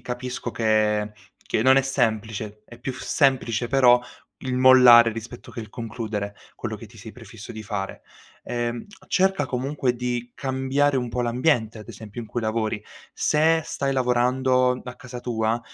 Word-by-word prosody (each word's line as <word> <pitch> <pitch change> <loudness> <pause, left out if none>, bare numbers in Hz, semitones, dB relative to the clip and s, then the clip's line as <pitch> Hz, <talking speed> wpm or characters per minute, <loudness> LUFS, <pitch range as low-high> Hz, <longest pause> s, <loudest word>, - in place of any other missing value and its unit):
capisco 125 0 -5
che 105 -2 +1 0.4
che - - +1
non 130 +2 +6
è 135 - +5
semplice. 110 -5 -2
È 120 - -14
più 130 +2 -4
semplice 125 -2 +1
però 125 -1 +5 0.4
il 130 -1 -2
mollare 125 -2 +8
rispetto 115 +2 -9
che - - -9
il 110 - -9
concludere 110 -3 -5 0.2
quello 110 -2 -5
che 115 - -11
ti 115 - -18
sei 110 +1 -10
prefisso 115 -3 -12
di 110 - -7
fare. 100 -2 -5 0.4
Ehm, 120 -1 -3 0.2
cerca 190 -4 +2
comunque 130 0 -1
di 120 0 -3
cambiare 135 +1 0
un 125 -1 -1
po' 125 - -2
l'ambiente 120 -2 +1
ad 105 - -12
esempio 110 +1 -9
in 110 - -10
cui 120 - -3
lavori. 110 -1 -2 0.3
Se 160 +2 +2
stai 140 -1 -2
lavorando 125 0 +2
a 125 - -8
casa 125 0 -9
tua, 115 -1 -1
120 Hz, 160 wpm, -24 LUFS, 110-130 Hz, 0.4 s, mollare